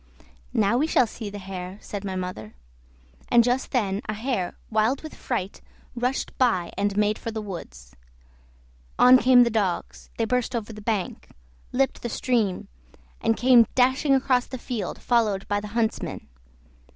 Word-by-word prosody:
"Now 215 +4 +3
we 305 - +2
shall 255 - +4
see 220 -1 -7
the 205 - -7
hare," 185 -1 -7
said 205 -2 -7
my 190 -2 -4
mother; 180 -13 -6 0.7
and 235 -1 +6
just 245 +2 0
then 205 -5 0
a 215 - -1
hare 220 -5 -2
wild 220 +6 +1
with 315 - -8
fright 200 -6 -4 0.3
rushed 250 +2 -2
by 185 -9 +2
and 205 0 -1
made 210 0 +2
for - - -5
the 220 -1 -4
woods. 65 - -9 1.0
On 255 +1 +8
came 250 0 +6
the 235 - 0
dogs; 200 -5 -2
they 230 - +1
burst 250 +1 -1
over 225 -1 -4
the 215 - -10
bank, 205 -3 -3 0.4
leaped 270 +1 0
the 240 - -3
stream, 220 -5 0 0.5
and 225 - +1
came 245 -2 +6
dashing 260 +2 +3
across 255 -2 +2
the 260 - -6
field 240 -3 -4
followed 215 -5 +1
by 205 0 0
the 210 - -7
huntsmen. 225 -2 -2
220 Hz, 165 wpm, -25 LUFS, 200-250 Hz, 1.0 s, On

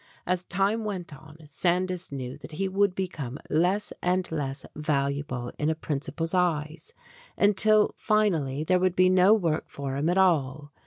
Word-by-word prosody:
As 180 0 0
time 200 +4 0
went 185 -7 -5
on, 150 +2 -14
Sandys 180 +3 -1
knew 130 -2 -5
that 150 +2 -12
he 195 +5 -1
would 195 0 +1
become 150 -9 -4
less 180 +6 +1
and 180 0 +1
less 140 -3 -3
valuable 140 -4 -2
in 150 - +1
a 160 - 0
principal's 155 +2 -3
eyes, 170 - -1 0.4
until 210 +1 +4
finally 165 -11 +1
there 180 +3 +2
would 185 -1 +1
be 185 0 +5
no 185 +2 +5
work 165 -7 -1
for 140 -1 -5
him 145 +4 0
at 180 - +1
all. 145 -6 +1
170 Hz, 160 wpm, -27 LUFS, 145-185 Hz, 0.4 s, be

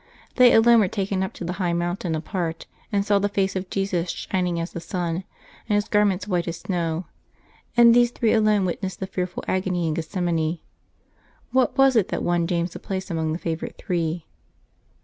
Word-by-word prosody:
They 250 -1 +8
alone 235 +1 +6
were 205 - +3
taken 195 0 -2
up 190 - -2
to 175 - -7
the 175 - -2
high 175 -1 +1
mountain 175 0 -1
apart, 165 0 -3 0.3
and 200 -1 +1
saw 205 -1 +3
the 205 +1 0
face 195 -1 0
of 185 0 -3
Jesus 185 -3 -1
shining 180 -2 -2
as 165 +1 -4
the - - -5
sun, 175 +1 -3 0.4
and 210 - +3
His 205 0 +1
garments 205 -2 +2
white 180 -3 0
as 165 -1 -3
snow; 170 -1 -2 0.7
and 235 -1 +8
these 240 0 +5
three 235 -2 +1
alone 215 -3 +3
wit 180 - -3
nessed 190 -2 -4
the 190 - -4
fearful 180 -1 -4
agony 185 -2 0
in 155 - 0
Gethsemane. 165 -1 -1 0.9
What 260 +1 +2
was 270 -1 +5
it 215 -5 +3
that - - -3
won 175 -1 +1
James 170 -1 -1
a - - -6
place 190 0 -5
among 160 -1 -1
the 160 - -1
favorite 165 -2 -4
three 170 -2 -2
185 Hz, 195 wpm, -24 LUFS, 170-200 Hz, 0.9 s, They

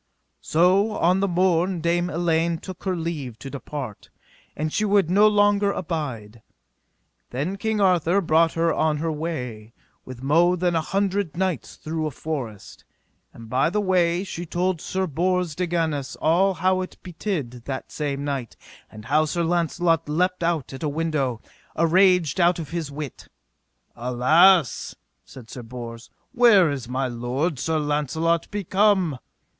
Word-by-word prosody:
So 185 +6 +3
on 180 +1 +2
the 200 - +1
morn 180 0 +1
Dame 175 +2 0
Elaine 170 0 0
took 185 +2 -10
her 185 -1 0
leave 155 -8 -4
to 135 - -9
depart, 140 -5 -7 0.5
and 155 +1 -2
she 215 - 0
would 200 -4 +2
no 205 +3 +6
longer 205 -1 +3
abide. 130 - -5 0.9
Then 145 +10 -3
King 220 +1 -2
Arthur 180 -1 +3
brought 165 -2 +3
her 165 -1 +1
on 155 -1 +1
her 160 +2 -2
way 125 -9 -5 0.3
with 130 0 -10
mo 170 +6 +4
than 175 -1 0
an 165 - +2
hundred 195 -1 -1
knights 185 -6 -2
through 155 0 -3
a - - -2
forest. 130 -8 -6 0.5
And 115 -1 -12
by 130 +6 +1
the 210 +4 -1
way 180 -2 +2
she 175 -3 -6
told 175 0 -1
Sir 190 0 -2
Bors 180 +1 0
de 180 +3 -2
Ganis 160 -5 -2
all 185 +5 +2
how 185 +2 +1
it 185 - -7
betid 155 - -4
that 135 -1 -5
same 140 -2 -3
night, 135 -5 -4 0.3
and 110 0 -11
how 150 +5 +2
Sir 170 +2 -1
Launcelot 165 -1 +1
leapt 180 +4 0
out 165 -6 -1
at 135 - -8
a 155 - -1
window, 145 -6 -2 0.3
araged 180 -1 +3
out 175 0 +4
of 160 -4 -7
his 165 -3 -3
wit. 145 -2 -7 0.7
Alas, 130 +7 +3 0.3
said 125 -4 -13
Sir 125 - -8
Bors, 115 -1 -9 0.2
where 230 - +5
is 130 -4 -5
my 130 +1 -1
lord, 125 +6 -2
Sir 160 +3 0
Launcelot, 155 +3 0
become? 195 -6 +1
165 Hz, 155 wpm, -23 LUFS, 140-180 Hz, 0.9 s, no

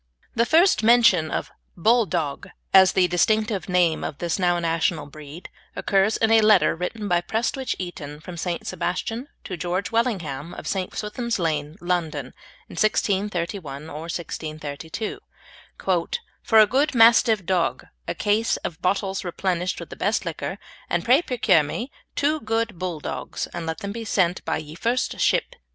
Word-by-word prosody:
The 235 +1 +2
first 340 - +5
mention 220 -8 +5
of - - -3 0.3
"Bulldog" 180 - +1 0.2
as 190 -1 +7
the 185 -1 +4
distinctive 215 +3 +1
name 175 -3 +2
of 140 - -4
this 170 +1 -2
now 175 -1 +2
national 165 -2 0
breed 150 +3 -10 0.3
occurs 195 +2 +2
in 225 0 +2
a 225 0 +6
letter, 215 -6 +5
written 205 +5 -4
by 175 -2 +2
Prestwich 240 +7 -1
Eaton 150 -5 -7
from 175 +3 -9
St. 170 0 -3
Sebastian 225 +8 -3 0.2
to 185 - -5
George 180 +4 -2
Wellingham 175 - -1
in - - -8
St. 190 -2 -3
Swithin's 235 +2 -2
Lane, 155 -2 -2
London, 160 -7 -2 0.3
in - - -12
1631 185 -8 -1
or 155 +3 -7
1632, 155 +2 -5 1.2
"for 225 - +4
a 215 - +9
good 275 +5 +1
Mastive 225 -3 +5
dogge, 180 -1 0 0.2
a - - -2
case 210 +2 +1
of 160 - -5
bottles 195 +1 0
replenished 180 0 -2
with - - -9
the - - -6
best - - 0
lickour, - - -4 0.3
and - - 0
pray 255 +6 +5
proceur 225 - +3
mee 235 - -5 0.2
two 305 +2 +1
good 225 - -2
bulldoggs, 175 -5 -4
and 170 -2 -5
let 160 0 -4
them 200 - -4
be 230 +2 -5
sent 185 -4 +1
by 160 - 0
ye 155 -1 -8
first 235 +9 -1
shipp." - - +1
185 Hz, 155 wpm, -24 LUFS, 165-220 Hz, 1.2 s, a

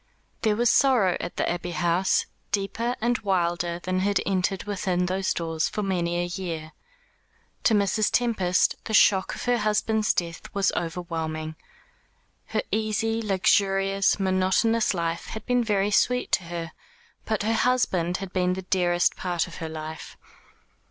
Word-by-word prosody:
There 215 -2 +2
was 240 +1 +3
sorrow 245 -9 +4
at - - -5
the - - 0
Abbey 175 0 -3
House 175 +2 +1 0.3
deeper 230 +5 -1
and 240 +1 +1
wilder 175 -4 0
than 185 0 -1
had 200 +2 +1
entered 190 0 0
within 185 -3 -1
those 185 +1 -1
doors 165 -1 -1
for 210 - -3
many 175 -3 -1
a 175 - 0
year. 170 -3 -5 0.9
To 225 - +5
Mrs. 205 +1 +2
Tempest 205 -7 +1
the 220 - 0
shock 190 -2 +4
of - - -7
her 245 0 +2
husband's 215 0 +1
death 170 -2 -3
was 200 0 +2
overwhelming. 160 -2 -4 0.9
Her - - -1
easy, 220 +1 0
luxurious, 195 -1 +2
monotonous 190 +4 +2
life 170 -1 -2
had 220 - -7
been 245 -1 +2
very 205 -2 +1
sweet 250 +4 +2
to 185 - +1
her, 165 -1 -5 0.5
but 215 -2 -1
her 220 +2 +1
husband 190 -8 +1
had 190 -1 -7
been 180 -1 +1
the 190 +1 -5
dearest 175 -1 +2
part 175 -2 -1
of 175 - -11
her 160 -1 -5
life. 155 0 -7
190 Hz, 150 wpm, -25 LUFS, 175-215 Hz, 0.9 s, To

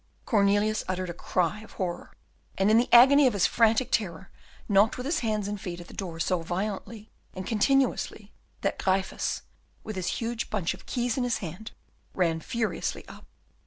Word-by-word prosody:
Cornelius 205 0 +2
uttered 185 -1 -2
a - - -7
cry 180 +3 -1
of 220 - -13
horror, 175 -3 -4 0.5
and 195 +2 +3
in 220 - +6
the 245 - -1
agony 270 +4 +8
of 250 - +1
his 200 -3 +2
frantic 230 +2 +3
terror 190 -3 -2 0.4
knocked 205 +1 +4
with 250 - -5
his 310 +3 0
hands 215 -3 -1
and 205 -1 -4
feet 175 -2 -5
at 175 - -11
the - - -12
door 170 -4 -6
so 180 +1 0
violently 205 +5 -4 0.2
and 185 0 -5
continuously, 225 -2 +1 0.3
that - - -1
Gryphus, 190 0 -1 0.4
with 215 - -6
his 180 -1 -3
huge 235 0 -3
bunch 190 -5 -1
of 190 - -14
keys 245 0 -1
in 255 - +1
his 245 -2 0
hand, 185 +5 -7 0.4
ran 165 -3 +1
furiously 220 -3 -3
up. - - -13
205 Hz, 180 wpm, -27 LUFS, 185-230 Hz, 0.5 s, agony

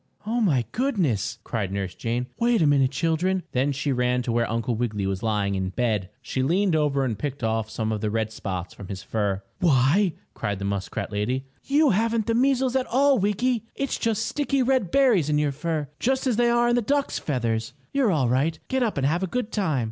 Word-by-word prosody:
"Oh, 235 +3 0
my 140 - +2
goodness!" 190 - 0
cried 100 -5 -3
Nurse 95 -2 -3
Jane. 120 +2 -2
"Wait 235 0 +3
a - - +4
minute, 140 -3 +4
children!" 165 +6 0
Then 130 +3 +1
she 135 +1 -1
ran 125 -1 +1
to 120 - -2
where 115 0 +1
Uncle 115 +2 -1
Wiggily 110 -4 -2
was 95 -1 -2
lying 105 -3 0
in 95 -1 -1
bed. 105 -3 -1
She 130 - -2
leaned 175 +6 +2
over 145 -3 +1
and 110 -5 -3
picked 140 -2 -4
off 110 -1 0
some 110 0 -2
of 105 -2 -2
the 110 - 0
red 110 0 -1
spots 95 -4 -5
from 100 - -10
his 95 -1 -6
fur. 100 -3 -1 0.2
"Why!" 160 +5 +3 0.2
cried 100 -1 -3
the 100 - -5
muskrat 100 +1 -3
lady. 125 +6 -1 0.2
"You 290 +1 +4
haven't 225 +2 +1
the 230 - +1
measles 260 +1 +2
at 260 -1 +1
all, 275 +1 +3
Wiggy! 225 +4 0
It's 275 -1 -2
just 220 -1 0
sticky, 275 -2 0
red 255 -7 +1
berries 225 - +3
in 150 - +2
your 150 -1 +1
fur, 150 +1 -2
just 265 +2 0
as 250 -4 +2
they 240 +1 +3
are 240 0 +3
in 240 - +3
the 245 - +2
ducks' 280 +5 0
feathers. 115 -4 -2 0.2
You're 270 -7 +3
all 145 -7 +2
right! 140 +7 +1
Get 265 0 0
up 225 -8 0
and 135 - +1
have 165 +6 +1
a 190 - 0
good 245 +3 -3
time!" 170 -10 0
145 Hz, 220 wpm, -25 LUFS, -, 0.2 s, a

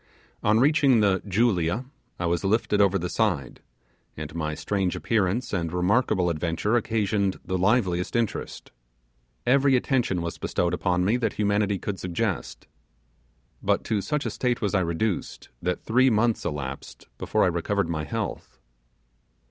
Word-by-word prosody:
On 105 +1 +3
reaching 140 -2 +4
the 95 -3 +2
'Julia' 100 0 +1 0.3
I 85 - -2
was 85 +1 0
lifted 105 0 +2
over 100 -1 +4
the 90 -1 -3
side, 90 - -1 0.6
and 75 0 -6
my 75 -2 -3
strange 95 -1 -1
appearance 110 +2 0
and 85 -4 -1
remarkable 90 0 +2
adventure 85 +7 -1
occasioned 105 -4 0
the 95 - -2
liveliest 95 -2 +1
interest. 115 -3 -2 0.7
Every 135 +2 +4
attention 120 - 0
was 85 - -5
bestowed 90 0 -1
upon 90 0 +1
me 110 +5 +2
that 125 - -1
humanity 105 -1 +1
could 95 +1 -5
suggest. 90 -2 -3 1.0
But - - +1
to 105 -2 -1
such 150 +6 -2
a - - -1
state 125 -2 -1
was 105 -2 -1
I 100 - +3
reduced, 90 +3 -2
that 90 0 -2
three 130 +4 +4
months 115 0 +1
elapsed 70 -3 -5
before - - +1
I - - +4
recovered 90 +2 -1
my 80 -2 -2
health. 75 - -5
100 Hz, 150 wpm, -25 LUFS, 85-115 Hz, 1.0 s, reaching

